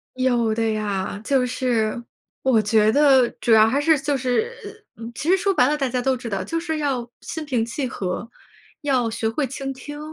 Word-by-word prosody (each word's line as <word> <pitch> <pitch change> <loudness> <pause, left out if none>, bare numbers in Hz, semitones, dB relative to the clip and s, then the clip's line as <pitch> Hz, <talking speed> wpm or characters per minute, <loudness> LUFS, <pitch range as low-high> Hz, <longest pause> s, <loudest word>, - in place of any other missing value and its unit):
有 240 -4 +1
的 225 0 0
呀， 205 -2 -3
就 260 0 +2
是 240 -2 -1 0.4
我 255 -4 +4
觉 215 +1 +3
得 270 -2 +5
主 230 - +2
要 215 0 +7
还 270 +5 +1
是 315 +2 +3
就 280 0 -1
是 260 - 0 0.6
其 310 - -3
实 380 - +5
说 390 +1 +1
白 250 -7 +4
了， 300 - 0
大 270 -2 0
家 250 0 -1
都 260 0 +1
知 240 -1 -7
道， 195 -3 -2
就 330 - -2
是 320 -2 -3
要 260 -5 -2
心 320 -1 -6
平 245 -6 0
气 255 +3 -3
和， 195 +1 -4 0.5
要 255 -5 +1
学 220 0 -2
会 270 +5 -1
倾 270 +1 -5
听。 290 +3 -8
250 Hz, 215 characters per minute, -22 LUFS, 225-285 Hz, 0.6 s, 要